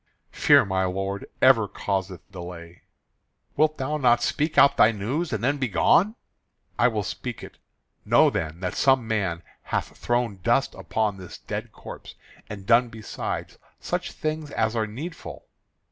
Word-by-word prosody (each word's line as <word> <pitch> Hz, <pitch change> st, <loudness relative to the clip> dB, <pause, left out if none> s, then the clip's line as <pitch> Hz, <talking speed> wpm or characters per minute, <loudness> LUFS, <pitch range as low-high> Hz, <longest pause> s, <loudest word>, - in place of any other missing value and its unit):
"Fear, -, -, +5 dB
my 95 Hz, -1 st, 0 dB
lord, 95 Hz, +2 st, -3 dB, 0.2 s
ever 115 Hz, -5 st, +6 dB
causeth 95 Hz, -3 st, -3 dB
delay." 85 Hz, -2 st, -9 dB, 0.7 s
"Wilt 155 Hz, 0 st, +2 dB
thou 150 Hz, +3 st, -2 dB
not 120 Hz, -4 st, +3 dB
speak 150 Hz, +5 st, -1 dB
out 140 Hz, -, +7 dB
thy 110 Hz, -, +6 dB
news 125 Hz, -, -3 dB
and 110 Hz, -2 st, -3 dB
then 140 Hz, +3 st, +1 dB
begone?" 140 Hz, -, +3 dB, 0.6 s
"I 120 Hz, -, +6 dB
will 110 Hz, -4 st, -1 dB
speak 120 Hz, +3 st, -6 dB
it. -, -, -12 dB, 0.4 s
Know -, -, +4 dB
then 80 Hz, +3 st, -4 dB
that 90 Hz, -1 st, -2 dB
some 130 Hz, -4 st, +3 dB
man 95 Hz, -7 st, -1 dB, 0.2 s
hath -, -, -3 dB
thrown 120 Hz, -4 st, -1 dB
dust 120 Hz, +7 st, +1 dB
upon 100 Hz, +2 st, -2 dB
this 90 Hz, -2 st, -10 dB
dead -, -, -6 dB
corpse, -, -, -11 dB, 0.3 s
and 100 Hz, -2 st, -8 dB
done 120 Hz, +2 st, +4 dB
besides 110 Hz, -2 st, -6 dB, 0.2 s
such -, -, -3 dB
things 155 Hz, -1 st, -4 dB
as 110 Hz, -4 st, -1 dB
are 110 Hz, -1 st, 0 dB
needful." 150 Hz, +11 st, -8 dB
110 Hz, 150 wpm, -25 LUFS, 95-130 Hz, 0.7 s, out